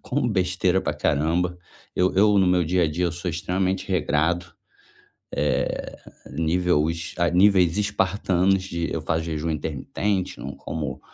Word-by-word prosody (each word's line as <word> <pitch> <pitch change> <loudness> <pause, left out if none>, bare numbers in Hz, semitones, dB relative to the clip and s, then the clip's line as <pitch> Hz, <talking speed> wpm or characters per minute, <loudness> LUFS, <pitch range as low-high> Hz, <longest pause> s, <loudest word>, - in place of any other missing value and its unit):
como 125 -2 -1
besteira 90 -2 +1
pra 75 - -2
caramba. 80 +4 0 0.4
Eu 90 +1 +2
eu 100 +1 +5
no 95 - +4
meu 90 -1 +3
dia 90 +2 +2
a 75 - 0
dia, 90 +4 -1
eu 85 - -2
sou 90 +1 -4
extremamente 90 +3 -1
regrado, 85 0 +1 0.9
eh, 75 +1 -1 0.4
nível 80 -1 +1
es 85 0 -5
a 85 0 +3
níveis 90 -2 +4
espartanos 95 -2 +1
de 85 -2 -3
eu 80 - -3
faço 80 0 -1
jejum 80 0 -2
intermitente 80 +4 -2
não 70 +2 -6
como 75 -3 -5
90 Hz, 150 wpm, -24 LUFS, 80-95 Hz, 0.9 s, eu